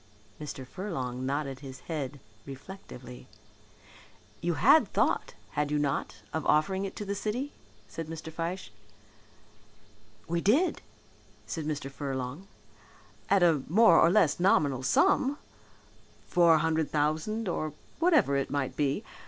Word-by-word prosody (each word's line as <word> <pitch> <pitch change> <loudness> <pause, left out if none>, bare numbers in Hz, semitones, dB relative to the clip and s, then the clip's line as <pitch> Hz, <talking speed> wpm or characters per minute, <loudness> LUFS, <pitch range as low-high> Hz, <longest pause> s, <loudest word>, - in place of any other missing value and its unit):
Mr. 135 -3 -6
Furlong 130 -7 -4
nodded 140 -1 -2
his 135 -2 -10
head 145 -4 -4 0.3
reflectively. 135 -4 -10 1.1
"You 175 -1 0
had 280 - +6
thought, - - +1 0.2
had 150 0 -1
you 150 - +1
not, 135 -7 -2
of 160 0 -1
offering 190 +6 +2
it 195 - -6
to 210 - -5
the 200 - -2
city?" 215 +8 -3 0.3
said 165 +5 -6
Mr. 160 0 -7
Fyshe. 170 - -4 1.6
"We 170 0 -1
did," 280 - +2 0.6
said 160 -3 -4
Mr. 145 -3 -3
Furlong, 135 +4 -5 0.8
"at 200 -2 +4
a 165 -5 +4
more 180 -2 +6
or - - +6
less 175 -6 +3
nominal 145 -8 +3
sum 270 - +3 0.9
four 170 -2 +5
hundred 160 0 +1
thousand 155 +9 0
or 155 -4 -2 0.3
whatever 320 - +4
it 140 -1 0
might 140 -2 -2
be. 145 +7 0
155 Hz, 130 wpm, -29 LUFS, 140-190 Hz, 1.6 s, had